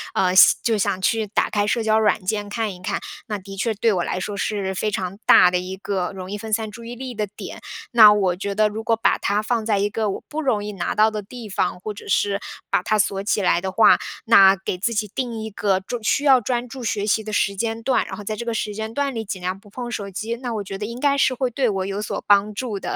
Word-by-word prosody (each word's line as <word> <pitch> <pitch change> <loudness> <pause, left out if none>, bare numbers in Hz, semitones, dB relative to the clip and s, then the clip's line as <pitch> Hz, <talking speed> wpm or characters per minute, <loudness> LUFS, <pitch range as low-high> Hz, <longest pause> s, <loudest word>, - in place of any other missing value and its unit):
呃， 185 -1 +2
想 190 - +8
就 230 - +2
想 200 -2 0
去 220 +1 +1
打 205 - 0
开 205 -1 +1
社 230 +2 0
交 220 0 +3
软 210 -3 +1
件 205 +1 -2
看 215 -1 -2
一 180 - -13
看。 - - -2 0.3
那 210 - -3
的 195 0 -10
确 220 +4 -1
对 220 +1 +2
我 180 -2 0
来 - - -2
说 205 +2 -4
是 200 -2 -2
非 215 +3 -1
常 195 -2 -4
大 180 - +7
的 180 - +1
一 185 +1 -6
个 190 -2 -2
容 185 0 -7
易 205 - -3
分 220 +1 -7
散 220 0 -1
注 235 +2 -11
意 235 +1 -7
力 255 0 -6
的 210 -2 -2
点。 205 - -9 0.3
那 220 -3 +9
我 195 -4 +2
觉 200 +2 -4
得 215 +1 +4
如 220 +1 -6
果 225 +1 +2
把 225 - +1
它 205 +1 0
放 230 0 -1
在 210 -2 +2
一 200 +1 +1
个 215 0 -1
我 195 - -5
不 310 +1 -3
容 220 -8 0
易 210 - -4
拿 195 -4 -3
到 215 +1 +4
的 215 -1 -4
地 230 +3 -10
方， 190 -2 -1
或 210 +3 -5
者 205 - -12
是 200 +1 +1 0.3
把 - - +3
它 215 +4 +1
锁 200 -2 +1
起 205 0 0
来 175 -1 +2
的 190 0 -3
话， 220 +4 +5 0.3
那 195 -4 +7
给 190 -1 -5
自 220 +5 0
己 210 -1 -1
定 235 -4 -3
一 220 - -5
个 200 -2 0
专 235 +5 -5
需 280 - +1
要 270 -3 +6
专 245 +1 -2
注 260 0 -8
学 205 -2 -1
习 220 +1 +1
的 215 0 -6
时 200 -1 +1
间 225 +2 -2
段， 260 +2 +1
然 - - -7
后 210 - -9
在 215 +2 -3
这 235 +2 -6
个 235 - -2
时 215 -1 -2
间 220 +1 -5
段 280 +1 -1
里 225 -2 -4
尽 195 -2 -5
量 185 +2 -3
不 205 0 -18
碰 240 +3 -6
手 200 -3 -4
机， 215 +4 -4
那 245 -1 -5
我 210 - -3
觉 195 0 -6
得 205 - -4
应 235 +3 -7
该 280 +1 +2
是 260 - +3
会 255 0 -1
对 245 +1 0
我 190 -2 -2
有 200 +1 -3
所 210 - -4
帮 205 +1 +4
助 215 -2 -4
的。 - - -4
210 Hz, 305 characters per minute, -22 LUFS, 195-225 Hz, 0.3 s, 那